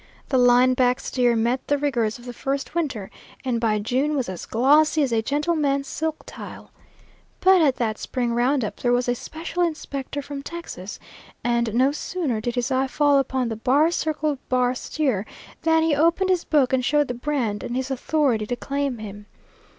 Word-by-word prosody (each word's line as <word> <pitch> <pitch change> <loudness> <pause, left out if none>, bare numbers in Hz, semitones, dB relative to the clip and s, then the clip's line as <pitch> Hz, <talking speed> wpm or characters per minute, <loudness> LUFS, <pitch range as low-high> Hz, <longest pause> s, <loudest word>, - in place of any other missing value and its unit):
The 260 - +3
line 245 +1 +5
back 250 0 +2
steer 245 -2 +1
met 235 +3 0
the 290 - +2
rigors 240 -7 0
of 240 - -15
the 245 - -6
first 275 +3 -3
winter 275 - -2 0.3
and 240 -3 0
by 220 -2 +2
June 260 +8 0
was 260 -8 -1
as 185 -2 -7
glossy 300 +6 +4
as 265 - -1
a 225 - +2
gentleman's 285 +1 0
silk 320 +1 -3
tile. - - -10 0.7
But 375 -1 +5
at 280 -5 +3
that 220 -3 -2
spring 245 -2 -2
round 250 +1 +2
up - - -6
there 245 - 0
was 245 0 +1
a 245 - +2
special 325 +7 -5
inspector 285 -4 -3
from 280 0 -6
Texas, 280 - -7 0.5
and 235 -2 0
no 260 +3 +4
sooner 295 -6 -2
did 240 +2 -3
his 245 +2 -1
eye 265 +1 +2
fall 285 +1 +3
upon 260 -2 -1
the 225 - -3
bar 280 +9 +3
circle 310 -4 -1
bar 250 -1 +2
steer 255 -5 -1 0.4
than 320 0 +3
he 325 -1 +2
opened 335 +5 +2
his 360 -2 +1
book 275 -4 +2
and 255 -1 +2
showed 295 +2 +2
the 245 - -3
brand 245 -5 -2
and 240 - -4
his 260 +1 -2
authority 260 -5 0
to 245 - -1
claim 275 0 -2
him. 205 -1 -9
260 Hz, 190 wpm, -23 LUFS, 240-295 Hz, 0.7 s, line